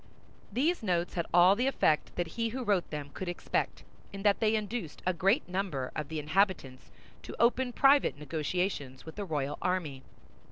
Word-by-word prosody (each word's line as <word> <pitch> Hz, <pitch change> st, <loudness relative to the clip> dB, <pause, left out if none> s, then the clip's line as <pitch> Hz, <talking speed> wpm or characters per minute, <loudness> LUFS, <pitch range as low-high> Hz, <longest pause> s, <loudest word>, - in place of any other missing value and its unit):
These 300 Hz, -, +1 dB
notes 175 Hz, -4 st, 0 dB
had 170 Hz, -2 st, -2 dB
all 180 Hz, +3 st, +6 dB
the 250 Hz, +5 st, 0 dB
effect 155 Hz, -, +1 dB
that 175 Hz, -2 st, -2 dB
he 230 Hz, +5 st, -2 dB
who 255 Hz, +3 st, -4 dB
wrote 200 Hz, -5 st, +1 dB
them 145 Hz, -2 st, -6 dB
could 185 Hz, -, -4 dB
expect, 175 Hz, -, -2 dB, 0.3 s
in 195 Hz, 0 st, -7 dB
that 205 Hz, -1 st, +3 dB
they 220 Hz, 0 st, +2 dB
induced 210 Hz, -6 st, -4 dB
a 185 Hz, -, +2 dB
great 195 Hz, -, +2 dB
number 180 Hz, -8 st, -2 dB
of 150 Hz, -, -3 dB
the 160 Hz, -, -5 dB
inhabitants 155 Hz, -4 st, 0 dB, 0.3 s
to -, -, -10 dB
open 245 Hz, +2 st, +3 dB
private 275 Hz, -, +4 dB
negotiations 150 Hz, -2 st, -3 dB
with 160 Hz, -, -9 dB
the 205 Hz, -, -4 dB
royal 145 Hz, -4 st, -2 dB
army. 165 Hz, -8 st, -1 dB
185 Hz, 175 wpm, -30 LUFS, 155-215 Hz, 0.3 s, all